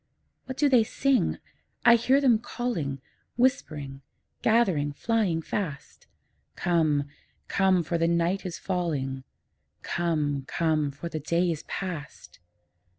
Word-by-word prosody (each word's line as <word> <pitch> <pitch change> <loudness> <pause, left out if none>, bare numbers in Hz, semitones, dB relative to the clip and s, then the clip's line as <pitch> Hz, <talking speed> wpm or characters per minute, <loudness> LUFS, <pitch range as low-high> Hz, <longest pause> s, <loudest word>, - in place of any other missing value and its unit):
What 260 0 -6
do 295 - +4
they 250 -5 +5
sing? 270 +4 +1 0.5
I 240 - +9
hear 255 +4 +4
them 250 -6 +4
calling, 195 - -3 0.4
Whispering, 150 - 0 0.4
gathering, 185 -11 +2
flying 195 -3 0
fast, 150 -9 -5 0.5
'Come, 155 -4 +2 0.4
come, 190 -3 +3
for 170 +1 -2
the 165 - +2
night 170 +3 +1
is 180 -3 -5
falling; 145 -8 -2 0.6
Come, 150 -5 -1
come, 155 -3 +1
for 145 +5 -7
the 160 -2 -4
day 170 +4 +1
is 155 - -4
past!' 175 - -6
170 Hz, 120 wpm, -27 LUFS, 150-220 Hz, 0.6 s, I